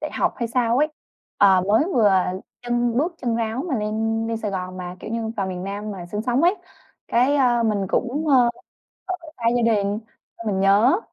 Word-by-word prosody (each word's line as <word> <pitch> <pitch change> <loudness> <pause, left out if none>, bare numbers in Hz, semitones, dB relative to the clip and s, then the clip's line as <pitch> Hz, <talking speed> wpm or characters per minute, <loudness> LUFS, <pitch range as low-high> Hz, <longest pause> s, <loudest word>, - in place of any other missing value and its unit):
đại - - -4
học - - 0
hay 235 -2 -2
sao 235 0 +1
ấy. 300 +2 +3 0.5
Ờ, 190 -2 +6
mới 220 +8 +4
vừa 215 -4 +5 0.5
chân 240 -1 0
bước 330 +6 0
chân 235 -2 -1
ráo 230 +3 -2
mà 275 - 0
lên 225 +1 -1
lên 230 - -1
Sài 215 -2 -3
Gòn, 185 -1 -4
mà 180 0 -6
kiểu 215 - -7
như, 230 -1 -2
vào 195 -2 -1
miền 180 -1 -5
Nam 205 +2 -5
mà 185 -4 -7
sinh 210 +4 -4
sống 245 +4 +1
ấy. 355 +3 +4 0.5
Cái, 255 +5 +3
a, 240 -3 +3
mình 205 -3 0
cũng, 275 +10 -1
ơ, 255 -4 +5 0.7
ở 325 - -12
xa 235 - -11
gia 245 - +2
đình 205 +1 -1 0.4
xong 230 - -7
mình 190 -2 0
nhớ. 210 - +4
225 Hz, 210 wpm, -22 LUFS, 200-245 Hz, 0.7 s, Ờ